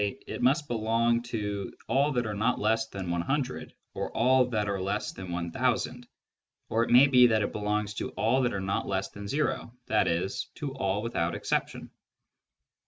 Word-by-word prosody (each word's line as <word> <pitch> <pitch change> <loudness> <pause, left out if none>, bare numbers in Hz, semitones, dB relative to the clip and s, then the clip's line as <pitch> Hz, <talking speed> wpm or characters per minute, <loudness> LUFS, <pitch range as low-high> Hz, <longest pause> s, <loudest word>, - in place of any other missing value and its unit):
it 100 -1 -4
must 140 +4 +3
belong 115 0 +1
to 105 -4 -4 0.2
all 140 +3 +2
that 120 -4 0
are 105 - -3
not 110 +5 +1
less 110 +1 +1
than 95 -5 -5
100, 130 - -2 0.2
or - - -3
all 130 +2 +5
that 110 -4 -1
are 100 -1 -1
less 100 +3 -2
than 95 -2 -8
1000, 120 +7 -1 0.6
or 115 +1 +2
it - - -3
may 125 +3 +8
be 125 -3 +6
that 110 -3 +2
it - - -2
belongs 105 0 -1
to - - -4
all 125 +4 +2
that 120 -1 +1
are 100 - -2
not 95 0 -2
less 95 0 -1
than 100 0 -9
o, 145 -5 -1 0.2
i.e. 95 -4 +2 0.3
to 140 -3 -5
all 100 -5 -1
without 85 -8 -1
exception. - - -2
110 Hz, 175 wpm, -28 LUFS, 100-125 Hz, 0.6 s, may